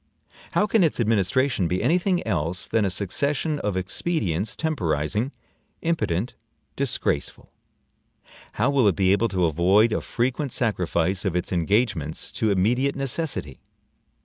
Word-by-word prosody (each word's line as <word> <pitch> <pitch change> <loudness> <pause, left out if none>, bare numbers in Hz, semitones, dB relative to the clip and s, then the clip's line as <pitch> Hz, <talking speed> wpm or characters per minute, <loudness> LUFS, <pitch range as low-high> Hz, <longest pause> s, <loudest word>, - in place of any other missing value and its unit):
How - - +3
can 210 -1 +3
its 160 - +1
administration 115 0 +2
be 90 +2 -1
any 175 +4 +3
thing 180 -1 0
else 90 -3 -1
than 110 -2 +1
a - - +1
succession 140 - -1
of 105 -6 -2
expedients 95 - -2
temporizing, 105 - -1 0.5
impotent, 125 - -1 0.4
disgraceful? - - -2 1.0
How 125 +6 +1
will 135 -6 +3
it 95 - +3
be 95 +2 +3
able 105 +4 +3
to 95 -4 0
avoid 95 +8 +3
a - - 0
frequent 130 +3 -2
sacrifice 90 -5 0
of 95 -4 -1
its 90 - -2
engagements 90 - 0
to 110 - 0
immediate 120 +8 +1
necessity? 135 - -3
105 Hz, 135 wpm, -24 LUFS, 90-135 Hz, 1.0 s, How